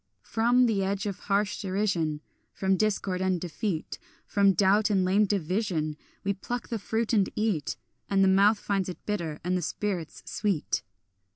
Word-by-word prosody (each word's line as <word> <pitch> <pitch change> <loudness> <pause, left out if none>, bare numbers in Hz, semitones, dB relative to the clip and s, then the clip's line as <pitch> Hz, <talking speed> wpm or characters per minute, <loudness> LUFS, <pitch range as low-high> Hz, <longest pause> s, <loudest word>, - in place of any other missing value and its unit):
From 240 +3 +3
the 210 -5 +1
edge 195 +1 -1
of 200 -3 -3
harsh 205 +1 0
derision, 185 -6 0 0.3
From 190 0 +1
discord 195 -2 0
and 185 -1 +1
defeat, 175 0 -3 0.3
From 200 -1 +3
doubt 205 +3 +3
and 190 -3 +2
lame 200 +3 +4
division, 180 -4 -1 0.3
We 200 - +1
pluck 240 +5 -5
the 230 - -2
fruit 225 +3 -1
and 200 -4 +3
eat; 200 - -1 0.3
And 195 -1 +3
the - - +5
mouth 200 +3 +5
finds 195 -2 -1
it 180 - -9
bitter, 170 -8 -2
and 180 +1 0
the 180 - 0
spirit 180 -5 -2 0.2
sweet. 200 -8 -1
195 Hz, 165 wpm, -28 LUFS, 185-210 Hz, 0.3 s, the